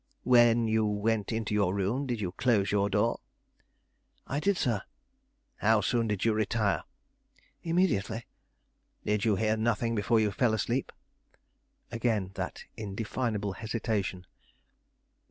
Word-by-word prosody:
"When 120 -2 +5
you 110 0 +2
went 105 +1 0
into 110 -2 -2
your 100 -3 +2
room 110 +8 -1
did 120 -3 -2
you 95 -4 -2
close 105 0 +1
your 100 0 +2
door?" 105 +4 +1 1.1
"I 140 - -2
did, 200 +4 +1
sir." 120 -10 0 0.8
"How 110 0 +3
soon 115 +3 +1
did 105 -1 -1
you 115 - +3
retire?" 105 -4 0 0.8
"Immediately." 145 - 0 0.8
"Did 105 0 +1
you 110 -3 +3
hear 110 +2 +1
nothing 115 +1 0
before 115 +1 +2
you 105 -1 +2
fell 110 +2 +2
asleep?" 120 +5 -1 1.0
Again 115 -5 0
that - - -5
indefinable 105 0 -3
hesitation. 105 -4 -3
110 Hz, 125 wpm, -29 LUFS, 105-115 Hz, 1.1 s, When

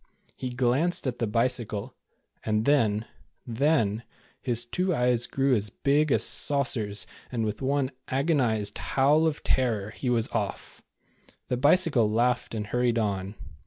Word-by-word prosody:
He 130 - -5
glanced 130 +9 +1
at 125 -2 -3
the 115 - 0
Bicycle, 115 0 -1 0.5
and 110 0 0
then 115 -7 +2 0.2
— - - -46
then 115 -4 +1 0.2
— - - -33
his 120 -2 -1
two 180 +7 -1
eyes 125 -2 +1
grew 135 0 +1
as 105 -3 0
big 145 +6 +1
as - - +4
saucers 115 -8 +1 0.3
and 115 -3 -1
with 105 +2 -4
one 135 0 0 0.2
agonized 130 -8 0
howl 150 +4 +2
of 155 -2 -3
terror, 110 -5 0
he 125 +2 -4
was 115 -2 +1
off. - - -4 0.7
The 125 - 0
Bicycle 145 -5 +3
laughed 120 +2 0
and 105 -1 -3
hurried 120 +2 0
on. 100 -2 -2
125 Hz, 150 wpm, -27 LUFS, 110-140 Hz, 0.7 s, as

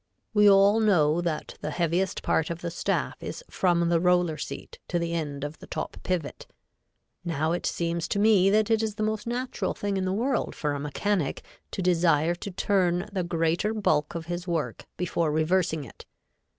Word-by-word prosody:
We 210 -1 +6
all 200 +2 +6
know 175 -7 +3
that 165 -3 -4
the 150 - -3
heaviest 175 +3 0
part 160 - +1
of 170 0 -5
the 170 - -3
staff - - -2
is - - -6
from 170 -2 +2
the 170 -1 +3
roller 180 -2 +3
seat 150 - -7
to 175 - 0
the 170 0 -2
end 145 -4 -3
of 150 +2 -5
the - - -12
top - - -5
pivot. 180 -5 -3 0.8
Now 160 -1 -1
it 175 - -1
seems 170 -1 -1
to - - -2
me 200 -2 +5
that 215 +2 +2
it 225 -1 +3
is 220 -2 -2
the 215 - -2
most 215 0 -2
natural 245 +2 -2
thing 200 -1 -2
in 190 - -1
the 185 - 0
world 245 +8 0
for 150 -2 -1
a 145 - -3
mechanic 150 +3 -1 0.3
to 190 - -4
desire 170 -2 +3
to 175 +3 -6
turn 185 0 +1
the 190 - 0
greater 170 +5 0
bulk 155 -8 +1
of 165 -1 -4
his 175 +2 -4
work 165 -3 -2
before 170 -3 0
reversing 160 0 +1
it. 125 - -13
175 Hz, 190 wpm, -27 LUFS, 165-200 Hz, 0.8 s, We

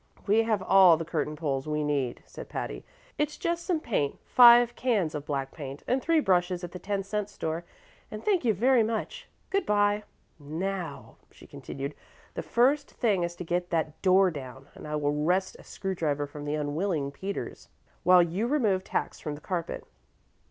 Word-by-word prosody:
"We 210 +2 +4
have 220 -4 0
all 185 -4 +7
the 165 - -4
curtain 155 -2 -2
poles 140 -3 -2
we 150 0 -1
need," 140 -4 -1
said - - -10
Patty. - - -5 0.4
"It's 300 0 -1
just 340 0 -2
some 345 -3 0
paint 195 - -1
five 240 -1 +7
cans 210 -11 0
of 150 -1 -6
black 135 -2 -2
paint, 140 -3 -8
and 260 +2 +1
three 330 +2 +3
brushes 180 -6 +1
at 175 - -6
the 180 - -8
ten 195 +2 -2
cent 210 +1 -3
store, 165 -3 -4 0.4
and - - -8
thank 390 -7 +2
you 235 - +3
very 240 +5 +3
much. 230 - -3 0.2
Good 395 0 +1
by. 205 0 +2 0.4
Now," 160 -1 -5
she - - -17
continued, 140 +1 -6 0.4
"the - - -4
first 275 +5 +2
thing 210 -7 0
is 170 0 -2
to 180 - -6
get 175 +1 -2
that 160 -2 -2
door 190 0 +5
down, 135 -2 -9
and - - -10
I 150 - -3
will 145 -1 0
wrest 185 +3 +1
a - - -13
screw 195 -1 -4
driver 150 -5 -1
from 145 +1 -9
the 145 +1 -1
unwilling 150 0 -1
Peters 195 +7 -6 0.3
while 180 -1 +6
you 180 +7 -1
remove 220 -10 +1
tacks - - -3
from 150 -2 -5
the - - -11
carpet." 175 -1 -4
180 Hz, 185 wpm, -28 LUFS, 150-215 Hz, 0.4 s, all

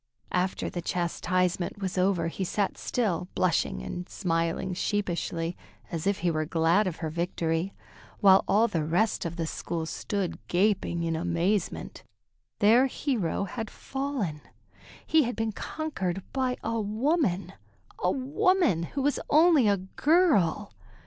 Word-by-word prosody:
After 180 +1 0
the 175 - -4
chastisement 180 +1 -1
was 190 -2 -3
over 180 -3 +2
he 180 +3 -3
sat 195 +2 -1
still, 190 -8 -1
blushing 160 - +1
and 175 - -6
smiling 165 0 -1
sheepishly, 175 -3 -2 0.4
as 165 +1 -3
if 200 -3 0
he 175 - +4
were 155 -1 0
glad 165 +6 +2
of 175 - -2
her 160 -2 -4
victory, 170 +1 -1 0.4
while 195 -1 +6
all 215 +4 +4
the 165 -8 -1
rest 175 +9 +1
of 170 0 -3
the 165 -1 -2
school 165 +1 -4
stood 195 +3 -3
gaping 180 -2 +1
in 165 -1 0
amazement. 175 +4 -1 0.6
Their 235 +6 +5
hero 230 - -1
had 220 +3 -5
fallen! 265 - -4 0.6
He 320 - +4
had 245 -3 -1
been 225 -1 -1
conquered 195 - -3
by 260 -2 0
a 230 0 -1
woman, 210 - 0 0.5
a - - +1
woman 285 - +2 0.2
who 275 - +1
was 290 +1 +1
only 310 -6 +5
a 200 -1 +3
girl! 205 - +2
190 Hz, 140 wpm, -28 LUFS, 170-225 Hz, 0.6 s, while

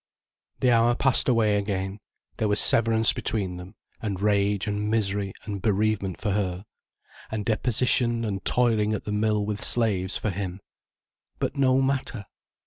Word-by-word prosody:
The 125 - +3
hour 120 +1 +3
passed 135 0 +2
away 110 -4 +2
again, 100 0 -3 0.4
there 110 - 0
was 105 0 +1
severance 115 -1 +3
between 95 -7 -3
them, 90 +4 -11 0.3
and 100 -4 -3
rage 100 0 +1
and 105 0 -2
misery 100 -3 -1
and 100 -2 -6
bereavement 105 -2 0
for 105 - -2
her, 95 -1 -2 0.6
and 110 -2 -4
deposition 120 +1 +1
and 100 -2 -4
toiling 110 -3 +1
at 105 - -4
the 105 - -5
mill 105 0 0
with 105 0 -3
slaves 100 -6 +3
for 105 - -2
him. 95 0 -5 0.8
But - - -3
no 135 -1 +3
matter. 135 -6 -2
105 Hz, 150 wpm, -25 LUFS, 100-115 Hz, 0.8 s, The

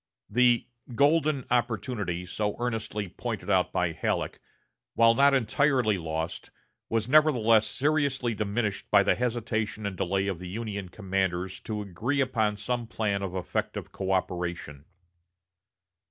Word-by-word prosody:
The 120 +1 +4 0.3
"golden 145 0 +3
opportunity" 110 -7 -1
so 105 +3 -2
earnestly 110 -4 -3
pointed - - -4
out - - +3
by - - 0
Halleck, - - -2 0.6
while 115 0 +6
not 140 +3 +5
entirely 125 -3 +2
lost, 80 0 -4 0.4
was 115 -1 0
nevertheless 125 -7 +5
seriously 140 -4 0
diminished 105 0 -2
by - - +6
the - - +3
hesitation 110 -3 -2
and 100 -1 -3
delay 95 +1 0
of 95 -4 -2
the 90 -1 -7
Union 100 -2 -4
commanders 95 -2 -2
to 105 -2 -4
agree 110 +9 -2
upon 110 -6 +1
some 120 +2 -3
plan 105 -3 -1
of 95 -1 -4
effective 90 -2 -3
coöperation. 90 -6 -2
110 Hz, 125 wpm, -28 LUFS, 95-125 Hz, 0.6 s, while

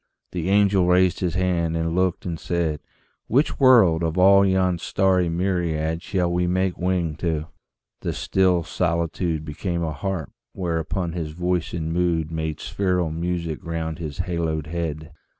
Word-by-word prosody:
The 90 0 -2
angel 100 -2 +4
raised 90 -1 +3
his 90 -3 -1
hand 85 -3 0
and 80 0 -1
looked 90 0 0
and 85 -3 -3
said, 85 -4 -1 0.5
"Which 135 +7 +1
world, 115 - +6
of 80 +1 -1
all 100 +2 +6
yon 95 -2 +2
starry 95 0 +2
myriad 85 -2 -1
Shall 90 -2 -1
we 90 0 +1
make 95 0 0
wing 90 -3 -1
to?" 80 -2 -2 0.5
The - - -3
still 90 -3 +1
solitude 85 0 -1
Became 85 +3 -3
a 80 -1 -2
harp 90 -2 -4 0.2
whereon 85 0 -2
his 80 -3 -4
voice 90 0 -1
and 80 -1 -2
mood 85 -2 0
Made 80 -2 -3
spheral 90 -4 -1
music 85 0 -3
round 80 -1 -4
his 80 0 -4
haloed 85 -4 -2
head. 80 -1 -4
85 Hz, 150 wpm, -23 LUFS, 80-90 Hz, 0.5 s, world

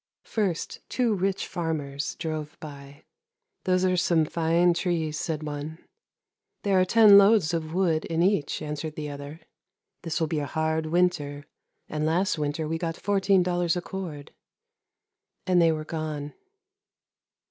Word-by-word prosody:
" - - -68
First 195 -7 -1
two 245 -3 +1
rich 195 0 -1
farmers 150 -5 -3
drove 155 -2 -5
by. 140 -1 -11 0.3
' 450 -3 -56
There 185 0 +2
are - - +2
some 170 -2 +3
fine 170 +2 +2
trees,' 165 -3 -1
said 155 -2 -3
one. 150 +1 -5 0.5
' - - -57
There 195 -2 +3
are - - +3
ten 210 0 +8
loads 200 -5 +4
of 160 0 -3
wood 170 -4 +1
in 165 +1 0
each,' 185 -8 +1
answered 150 +1 -5
the 150 -1 -5
other. 145 +3 -8 0.3
' - - -58
This 165 -3 -2
will 160 - +2
be 155 0 -1
a 145 - -3
hard 160 +1 -1
winter, 155 -4 0 0.4
and 150 0 -3
last 170 +2 +1
winter 150 +1 -2
we 165 +1 -2
got 165 -1 -3
fourteen 195 -2 +2
dollars 175 -1 0
a - - -2
cord,' 165 -8 -7 1.1
and 180 -2 +4
they 165 -1 +5
were 155 -1 -3
gone. 155 -3 -4
165 Hz, 160 wpm, -26 LUFS, 155-185 Hz, 1.1 s, ten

